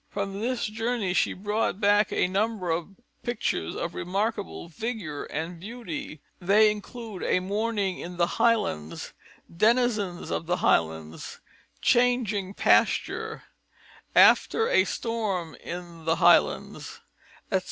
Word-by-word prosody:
From 200 -1 -4
this 245 +1 -1
journey 225 -3 -1
she - - +2
brought 210 0 -1
back 205 0 +3
a - - +2
number 195 -1 -1
of 170 +4 -3 0.3
pictures 240 - -2
of 170 - -3
remarkable 200 +1 -3
vigour 175 -4 -5
and 165 +3 -5
beauty. 185 - -7 0.2
They 210 +4 +5
include 210 -1 -8
a - - +2
Morning 200 0 -1
in 175 +1 -7
the 170 0 0
Highlands, 205 - 0 0.4
Denizens 215 -3 +1
of 160 - -2
the 180 +1 +1
Highlands, 80 -1 0 0.4
Changing 220 -6 +2
Pasture, - - +2 0.7
After 450 0 +5
a - - +4
Storm 205 -8 -2
in 170 -2 -8
the 165 0 +2
Highlands, - - +2 0.5
etc. 190 - +3
200 Hz, 120 wpm, -26 LUFS, 175-225 Hz, 0.7 s, They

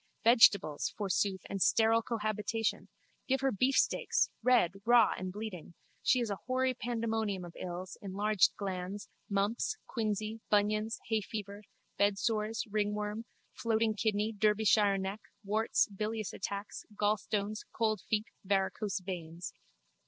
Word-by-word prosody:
Vegetables, 210 - +5
forsooth, 195 -2 0
and 195 - -4
sterile 225 +3 +4
cohabitation! 220 -1 -2 0.4
Give 265 -1 +1
her 270 -1 +2
beefsteaks, 255 +6 +2
red, 235 -7 +4
raw, 235 -1 +5
bleeding! 185 -3 -6 0.3
She 255 - +3
is 235 -3 -1
a 200 - -3
hoary 260 0 +1
pandemonium 225 -6 -2
of 170 - -11
ills, 180 +1 -6
enlarged 200 0 +2
glands, 195 0 -5 0.2
mumps, 205 - 0
quinsy, 215 -1 -2
bunions, 215 +2 +2
hayfever, 210 -1 -3 0.4
bedsores, 210 +2 +1
ringworm, 210 +1 -1 0.3
floating 225 -1 +1
kidney, 215 0 0
Derbyshire 210 -1 +3
neck, 195 +2 -4 0.2
warts, 215 +3 +2
bilious 215 +1 -3
attacks, 200 +1 -5
gallstones, 210 0 0
cold 215 -4 0
feet, 215 0 +1 0.2
varicose 195 +1 0
veins. 175 -2 -6
210 Hz, 115 wpm, -32 LUFS, 200-225 Hz, 0.4 s, Vegetables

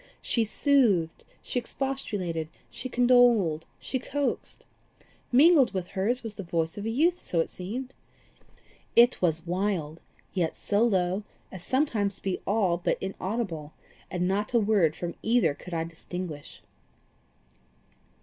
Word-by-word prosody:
She 230 -2 +1
soothed, 215 - +2 0.2
she 250 - -1
expostulated, 205 - -3 0.2
she 255 - -6
condoled, 240 -10 +4
she 260 - -3
coaxed. 285 +2 -3 0.7
Mingled 275 - +6
with 180 -2 -3
hers 230 +7 0
was 225 -2 -5
the 205 - -7
voice 165 -2 -1
of 205 - -6
a - - -1
youth, 330 +9 +2
as - - -11
it 165 - +1
seemed. 245 +8 -6 1.0
It 240 +2 +6
was 165 -2 +1
wild, 175 -4 -2 0.3
yet 170 -4 -1
so 205 +1 0
low 190 -4 +2 0.3
as 190 - -8
sometimes 230 -8 0
to - - -14
be 190 -2 -2
all 195 -4 +2
but 175 - 0
inaudible, 190 -5 -4 0.4
and 180 0 -1
not 205 +5 -1
a - - +6
word 200 -7 +3
from 175 -1 -4
either 230 -8 +3
could 180 - -11
I 165 - 0
distinguish. 165 -2 -7
200 Hz, 140 wpm, -27 LUFS, 175-245 Hz, 1.0 s, Mingled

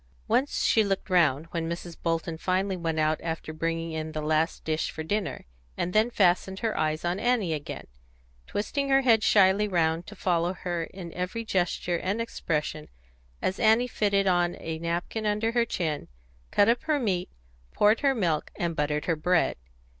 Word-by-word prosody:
Once 275 +3 +1
she 220 - +4
looked 195 -2 -2
round, 160 -5 +3
when 165 -1 -2
Mrs. 170 0 -5
Bolton 165 0 -1
finally 185 +3 0
went 165 -3 -2
out 155 0 +1
after 160 -1 -4
bringing 165 +1 -2
in 160 0 -4
the 155 - -3
last 155 +2 0
dish 155 0 -1
for 160 - -6
dinner, 205 +4 -2 0.3
and 180 - -2
then 220 +2 +4
fastened 190 -3 +2
her 225 -2 -1
eyes 155 +1 -1
on 175 +2 0
Annie 225 -8 +1
again, 150 -2 -5 0.6
twisting 275 +7 -2
her 270 0 +5
head 230 -4 +4
shyly 200 0 +4
round 165 -3 0
to 210 - -9
follow 175 -2 0
her 175 -2 -3
in 175 -2 -9
every 185 +6 -3
gesture 175 -3 0
and 195 +4 -2
expression 155 -9 -3 0.6
as 190 - -1
Annie 225 +2 +4
fitted 200 -4 +1
on 175 -2 +2
a 160 0 -5
napkin 175 +6 -2
under 210 +2 +1
her 235 0 +2
chin, 160 -9 -2 0.4
cut 205 - +4
up 235 +1 +3
her 310 -2 +2
meat, 185 -7 -1 0.4
poured 210 +2 +4
her 275 -2 +2
milk, 170 -9 0
and 170 -1 -2
buttered 150 0 -1
her 165 - +1
bread. 170 +3 +2
180 Hz, 175 wpm, -27 LUFS, 165-210 Hz, 0.6 s, her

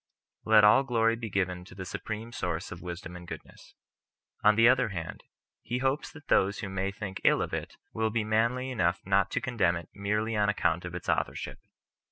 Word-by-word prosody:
Let 110 -1 +6
all 105 +5 +7
glory 115 -4 +2
be 115 -1 -6
given 90 -2 -1
to 90 - -13
the 95 0 -6
Supreme 110 +5 -5
Source 90 -6 -3
of 85 - -8
wisdom 90 -1 -7
and 90 -1 -10
goodness. - - -11 0.7
On 105 0 +6
the 115 +1 +6
other 125 -2 +4
hand, 85 -5 -6 0.4
he 120 - -3
hopes 135 +3 -1
that 150 -4 -14
those 100 +2 +3
who 100 - -4
may 95 0 -1
think 100 -2 -6
ill - - +5
of - - -3
it - - -4 0.2
will 110 0 0
be 110 0 0
manly 115 +4 +1
enough 85 -7 +1
not 100 0 +3
to - - -1
condemn 100 -9 +1
it 85 -1 -7
merely 105 +3 -1
on 105 -1 +2
account 90 -4 0
of 90 -1 -6
its 90 - -7
authorship. - - -1
105 Hz, 205 wpm, -29 LUFS, 90-115 Hz, 0.7 s, all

